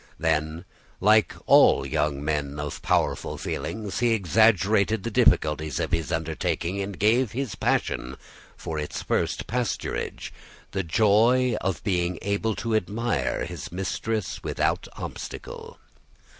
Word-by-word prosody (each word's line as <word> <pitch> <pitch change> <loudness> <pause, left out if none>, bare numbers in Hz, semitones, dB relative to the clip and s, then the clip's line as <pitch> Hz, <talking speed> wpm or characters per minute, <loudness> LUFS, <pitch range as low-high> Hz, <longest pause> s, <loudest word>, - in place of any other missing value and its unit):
Then, 80 +1 -1 0.3
like 105 +2 +4
all - - +6
young 75 -1 -1
men 75 -2 -2
of 75 -1 -5
powerful - - 0
feelings, 100 +8 -4
he 120 -1 +3
exaggerated 105 +1 +3
the 115 - -3
difficulties 75 -6 +2
of - - -2
his 80 0 -1
undertaking, 80 +3 -2
and 100 -1 -5
gave 110 +3 +2
his 130 -3 -3
passion, - - -1 0.4
for 80 -1 -4
its 75 - -4
first - - -1
pasturage, 125 -1 -3 0.4
the 95 - -1
joy 110 +7 +3
of 95 -5 -2
being 90 -3 0
able 100 +2 0
to 115 -1 -3
admire 110 - -1
his - - -7
mistress 95 +3 -3
without - - -1
obstacle. - - -8
95 Hz, 125 wpm, -25 LUFS, 80-110 Hz, 0.4 s, all